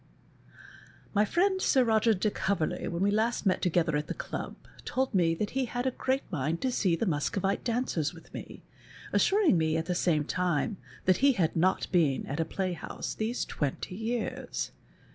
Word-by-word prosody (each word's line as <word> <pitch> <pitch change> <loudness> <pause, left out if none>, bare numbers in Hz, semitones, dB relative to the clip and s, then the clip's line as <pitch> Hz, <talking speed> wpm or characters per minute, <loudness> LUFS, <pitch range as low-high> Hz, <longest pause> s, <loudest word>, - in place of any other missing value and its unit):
My 210 0 +4
friend 375 - +2
Sir 265 -7 +4
Roger 225 -1 +3
de 205 +3 0
Covcrley, 190 -6 -1
when 170 +2 -1
we 200 - +3
last 220 +2 +1
met 185 - +2
together 170 -3 +2
at 150 0 -1
the - - -4
ehib, - - -5 0.3
told 260 -1 -1
me 170 -4 +3
that 205 +4 -2
he 265 0 0
had 245 +1 -3
a 260 - +2
great 265 +2 -1
mind 160 0 -1
to 260 - +1
see 185 -8 +2
the 230 - -1
Museovite 190 +4 0
daneers 230 - 0
with 165 -2 -15
me, - - -8 0.5
assuring 385 - +4
me 160 0 +1
at 160 - -1
the 180 - -1
same 165 -4 +2
time 180 +4 0 0.3
that 185 -1 +4
he 275 0 +5
had 170 -7 0
not 180 +3 +2
been 160 -7 +2
at 145 +4 -4
a 165 - +1
playhouse 185 0 -4
these 225 +3 -2
twenty 145 +4 -3
years. 225 +3 -3
190 Hz, 180 wpm, -29 LUFS, 165-235 Hz, 0.5 s, he